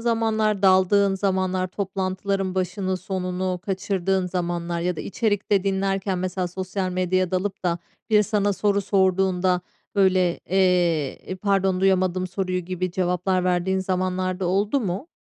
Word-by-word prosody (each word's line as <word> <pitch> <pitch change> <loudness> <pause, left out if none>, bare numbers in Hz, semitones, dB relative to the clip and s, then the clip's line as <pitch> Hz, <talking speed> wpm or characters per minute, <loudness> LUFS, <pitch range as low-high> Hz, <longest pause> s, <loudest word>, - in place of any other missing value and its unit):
zamanlar, 220 -3 +1
daldığın 195 +1 +4
zamanlar, 185 -1 0
toplantıların 190 0 -2
başını 185 0 -1
sonunu 185 -1 -3
kaçırdığın 190 -1 0
zamanlar 175 -1 -2
ya 180 0 -1
da - - -4
içerikte 205 -3 0
dinlerken 195 -1 0
mesela 185 0 -2
sosyal 185 +1 -3
medyaya 185 0 0
dalıp 190 +1 -2
da 170 -1 +1 0.3
biri 210 -1 +5
sana 205 -1 +1
soru 200 +1 +1
sorduğunda, 190 -2 +2 0.3
böyle, 185 -3 +3
eee, 175 -6 +2
"İii, 185 - -4
pardon, 195 -1 +1
duyamadım 185 -1 +2
soruyu?" 185 0 -2
gibi 185 0 -3
cevaplar 180 +1 0
verdiğin 180 +1 +1
zamanlar 185 0 -1
da 185 - 0
oldu 205 +8 +1
mu? 200 - -3
185 Hz, 135 wpm, -24 LUFS, 180-195 Hz, 0.3 s, biri